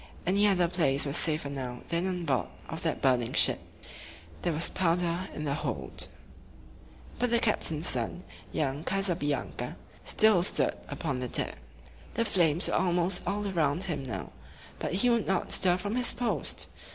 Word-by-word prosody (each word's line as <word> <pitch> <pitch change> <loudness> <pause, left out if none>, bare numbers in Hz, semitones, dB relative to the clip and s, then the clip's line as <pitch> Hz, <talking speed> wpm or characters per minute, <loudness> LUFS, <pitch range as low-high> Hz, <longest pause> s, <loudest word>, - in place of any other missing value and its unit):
Any 200 +4 +3
other 180 -3 +3
place 150 -6 +1
was 140 0 +2
safer 155 -3 +1
now 125 -3 -5
than 170 +2 0
on 180 -2 -3
board 135 -5 0 0.2
of 160 0 -6
that 160 -2 -2
burning 125 -3 +2
ship. - - +7 0.8
There 175 - 0
was 160 +1 +2
powder 175 0 0
in 150 - -6
the 145 -2 -1
hold. - - -4 1.1
But 245 - +1
the 235 - +3
captain's 170 -8 0
son, 125 +8 0 0.3
young 145 0 -2
Ca 195 +3 0
sa 195 -2 +1
bi 155 -4 -4
an´ca, 145 -2 -3 0.3
still 215 -5 +4
stood 180 - +1
upon 135 -6 -3
the 125 - -3
deck. - - -1 0.6
The 230 - +1
flames 170 -5 +2
were - - -2
almost 180 0 +1
all 205 +2 -1
around 165 -3 0
him 165 -7 -3
now; 100 - -6 0.5
but - - -2
he 245 +6 +3
would 230 -2 +1
not 190 -1 0
stir 180 -1 +5
from 205 +4 -3
his 250 -1 +2
post. 220 - -2
170 Hz, 175 wpm, -29 LUFS, 145-190 Hz, 1.1 s, ship